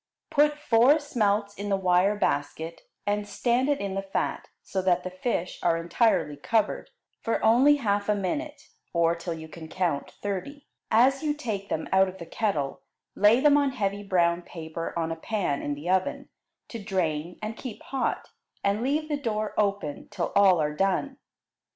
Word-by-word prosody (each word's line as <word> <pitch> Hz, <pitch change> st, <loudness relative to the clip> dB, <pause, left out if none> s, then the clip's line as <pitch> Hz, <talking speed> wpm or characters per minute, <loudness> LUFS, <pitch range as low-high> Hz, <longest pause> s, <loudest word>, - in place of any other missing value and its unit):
Put 295 Hz, -1 st, +3 dB
four 260 Hz, 0 st, +5 dB
smelts 210 Hz, -8 st, 0 dB
in 205 Hz, 0 st, -5 dB
the 195 Hz, -, +2 dB
wire 185 Hz, +2 st, +3 dB
basket, 160 Hz, -2 st, -2 dB, 0.2 s
and 205 Hz, 0 st, -1 dB
stand 240 Hz, +6 st, +1 dB
it 285 Hz, -, +1 dB
in 200 Hz, -1 st, -3 dB
the 195 Hz, -, -1 dB
fat, 195 Hz, 0 st, -3 dB, 0.2 s
so 190 Hz, -, -2 dB
that 180 Hz, -1 st, +2 dB
the 185 Hz, -, -5 dB
fish 185 Hz, -2 st, -2 dB
are 170 Hz, -1 st, +2 dB
entirely 165 Hz, -3 st, +1 dB
covered, 215 Hz, +9 st, 0 dB, 0.3 s
for 230 Hz, -, -1 dB
only 260 Hz, +6 st, +6 dB
half 205 Hz, -6 st, 0 dB
a 210 Hz, -, +4 dB
minute, 290 Hz, -, -3 dB, 0.3 s
or 170 Hz, -1 st, +3 dB
till 170 Hz, 0 st, -5 dB
you 160 Hz, 0 st, -9 dB
can 160 Hz, 0 st, -10 dB
count 165 Hz, -5 st, -1 dB
thirty. 205 Hz, +9 st, -5 dB, 0.2 s
As 260 Hz, +5 st, +4 dB
you 300 Hz, -2 st, 0 dB
take 215 Hz, -9 st, -4 dB
them 160 Hz, -, -2 dB
out 190 Hz, 0 st, +5 dB
of 185 Hz, -, -10 dB
the 170 Hz, -, -8 dB
kettle, 165 Hz, -7 st, -2 dB, 0.3 s
lay 215 Hz, +5 st, +5 dB
them 290 Hz, 0 st, +6 dB
on 280 Hz, -2 st, +1 dB
heavy 200 Hz, -4 st, -1 dB
brown 175 Hz, -3 st, +2 dB
paper 165 Hz, -1 st, -6 dB
on 165 Hz, -1 st, -1 dB
a -, -, -2 dB
pan 170 Hz, -4 st, -2 dB
in 145 Hz, -, -2 dB
the 145 Hz, +4 st, -8 dB
oven, 185 Hz, 0 st, 0 dB, 0.4 s
to 230 Hz, -3 st, -7 dB
drain 175 Hz, -4 st, -2 dB
and 215 Hz, +1 st, -5 dB
keep 235 Hz, -2 st, -8 dB
hot, 270 Hz, -2 st, -2 dB, 0.3 s
and 200 Hz, +2 st, +1 dB
leave 295 Hz, +5 st, 0 dB
the 295 Hz, -2 st, -1 dB
door 215 Hz, -4 st, -2 dB
open 200 Hz, -8 st, -1 dB
till 190 Hz, -5 st, -3 dB
all 190 Hz, -4 st, +6 dB
are 150 Hz, -1 st, 0 dB
done. 195 Hz, -, 0 dB
200 Hz, 180 wpm, -27 LUFS, 170-235 Hz, 0.4 s, only